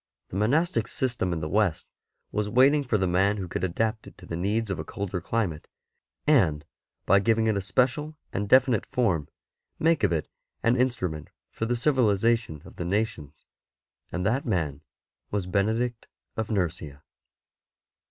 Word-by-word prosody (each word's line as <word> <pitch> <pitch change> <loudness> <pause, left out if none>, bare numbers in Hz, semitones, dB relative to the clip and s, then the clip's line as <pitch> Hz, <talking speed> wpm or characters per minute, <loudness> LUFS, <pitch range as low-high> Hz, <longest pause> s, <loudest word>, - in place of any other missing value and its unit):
The - - -8
monastic 115 - +1
system 120 -8 -1
in 80 -2 -2
the 75 - -2
West 95 -2 +1 0.5
was 105 0 -1
waiting 135 +6 +5
for 120 -5 +1
the 95 - +1
man 95 +4 +2
who 95 -2 -4
could 85 - -4
adapt 110 +5 -1
it - - -14
to 90 - -13
the 85 - -5
needs 100 +4 -1
of 95 - -3
a - - -3
colder 100 0 -4
climate, 95 -6 -2 0.6
and, 90 - +3 0.4
by 100 +1 +5
giving 115 +2 +2
it 110 -1 +2
a 100 - 0
special 130 +10 0 0.2
and 100 +1 -2
definite 130 -4 +4
form, 95 - 0 0.5
make 165 -3 +2
of 100 - +3
it 80 -2 -1 0.4
an 115 +2 +4
instrument 95 - -1 0.2
for 115 - -3
the 120 - +1
civihzation 115 - +1
of - - -14
the - - -3
nations, 90 -7 -2 0.7
and 90 0 -2
that 120 +7 +1
man 80 - -1 0.5
was 100 -3 -2
Benedict 110 +6 0 0.3
of 110 -1 -3
Nursia. 80 -8 -2
105 Hz, 160 wpm, -27 LUFS, 90-120 Hz, 0.7 s, waiting